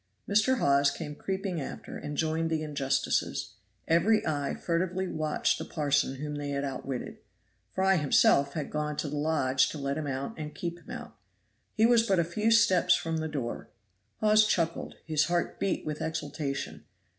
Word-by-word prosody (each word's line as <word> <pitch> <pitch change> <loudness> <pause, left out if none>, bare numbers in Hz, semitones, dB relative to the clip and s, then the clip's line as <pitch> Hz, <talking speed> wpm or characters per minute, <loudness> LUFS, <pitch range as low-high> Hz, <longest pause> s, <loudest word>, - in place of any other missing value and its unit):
Mr. 215 +6 +3
Hawes 140 -7 +4
came 150 - -6
creeping 190 0 -3
after - - -7
and 145 0 -6
joined 160 0 0
the 160 -1 -1
injustices; 135 -6 -1 0.3
every 200 +7 +3
eye 145 -3 -1
furtively 185 +2 -1
watched 155 -3 0
the - - -3
parson 145 -3 0
whom 150 +2 -5
they 145 -1 -4
had 140 0 -2
outwitted. 135 -2 -5 0.5
Fry 190 0 +2
himself 140 -1 +4
had 155 -3 -4
gone 150 -1 -2
to - - -2
the 145 - -4
lodge 140 -4 +2
to - - -6
let 140 +1 -2
him 150 - -4
out 135 +9 -3
and 150 -1 -6
keep 170 0 -4
him - - -18
out. - - -8 0.6
He 220 - +4
was 235 -1 +6
but 200 -5 +1
a 170 - +4
few 210 +7 0
steps 190 -6 +5
from 165 -1 -2
the 160 0 -2
door. 135 -6 -4 0.5
Hawes 215 0 +5
chuckled; 165 -5 -1
his 155 -1 +2
heart 175 +1 -1
beat 195 - -1
with 150 0 -4
exultation. 150 -3 -4
155 Hz, 175 wpm, -29 LUFS, 145-180 Hz, 0.6 s, was